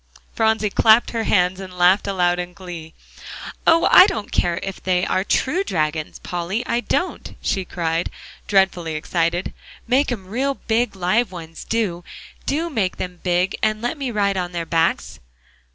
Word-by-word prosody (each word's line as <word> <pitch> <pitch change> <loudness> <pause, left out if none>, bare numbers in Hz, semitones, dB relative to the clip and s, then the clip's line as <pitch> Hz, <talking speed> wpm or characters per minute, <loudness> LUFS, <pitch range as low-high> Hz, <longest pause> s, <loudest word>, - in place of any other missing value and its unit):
Phronsie 220 -2 +1
clapped 220 +3 +5
her 230 -1 -2
hands 180 -1 +2
and 185 -2 -9
laughed 180 +4 +4
aloud 180 -2 +1
in 180 0 -5
glee. 170 -3 -9 0.7
"Oh! 330 0 +5
I 370 - +9
don't 215 - -4
care 170 -1 +1
if 195 -1 -6
they 180 -1 +1
are 185 - 0
true 315 - +1
dragons, 155 - -2
Polly, 180 +7 -3
I 235 - 0
don't," 355 +8 -2
she 190 -2 -1
cried, 165 -1 -2 0.4
dreadfully 185 -5 +2
excited. 170 +3 -1 0.3
"Make 265 +3 +2
'em 205 -6 -4
real 260 +8 -1
big 225 -3 -1
live 190 +4 +1
ones, 165 -2 -9
do; 200 -7 -1 0.4
do 320 +4 0
make 205 -9 -1
them 180 -1 -6
big, 180 +1 +1
and 215 0 +1
let 240 +6 -2
me 275 -4 -3
ride 200 -3 0
on 180 -1 -3
their 170 -1 -3
backs." 165 0 0
190 Hz, 165 wpm, -21 LUFS, 175-225 Hz, 0.7 s, I